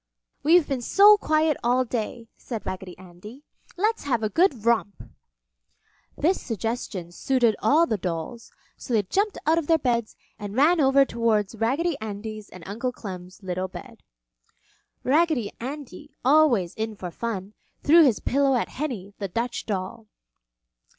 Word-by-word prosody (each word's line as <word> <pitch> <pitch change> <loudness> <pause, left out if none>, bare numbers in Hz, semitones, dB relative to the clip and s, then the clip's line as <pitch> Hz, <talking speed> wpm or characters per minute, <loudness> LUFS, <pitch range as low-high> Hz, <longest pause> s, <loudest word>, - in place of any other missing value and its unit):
"We've 330 +1 +4
been 270 -3 -2
so 405 - +7
quiet 310 -5 +1
all 250 +2 +2
day," 230 0 -4
said 230 -4 -7
Raggedy 185 -1 -6
Andy. 190 +9 -13 0.3
"Let's 435 +1 0
have 240 -5 0
a 215 - +1
good 265 - +1
romp!" 230 -4 +1 1.1
This 350 +6 +1
suggestion 225 -6 -4
suited 240 +3 +1
all 320 +4 +4
the 220 -9 -2
dolls, 180 +6 -5 0.2
so 245 - -3
they 210 - +3
jumped 400 - -1
out 320 +2 +3
of 310 - -6
their 325 - +4
beds 235 -6 -1 0.2
and 205 0 -6
ran 310 +5 +4
over 275 0 +5
towards 225 -5 0
Raggedy 275 +9 0
Andy's 215 0 -6
and 185 - -12
Uncle 235 +6 -3
Clem's 185 -4 -9
little 185 0 -3
bed. - - -11 1.0
Raggedy 290 -5 +2
Andy, 285 +2 -8
always 260 - +4
in 220 0 -4
for 180 -3 -7
fun, 205 -1 -5 0.3
threw 330 +3 +7
his 255 -8 +3
pillow 275 0 +2
at 245 - -1
Henny, 235 -9 -5
the 200 - -3
Dutch 230 +6 -3
doll. 210 +2 -4
235 Hz, 150 wpm, -25 LUFS, 205-290 Hz, 1.1 s, so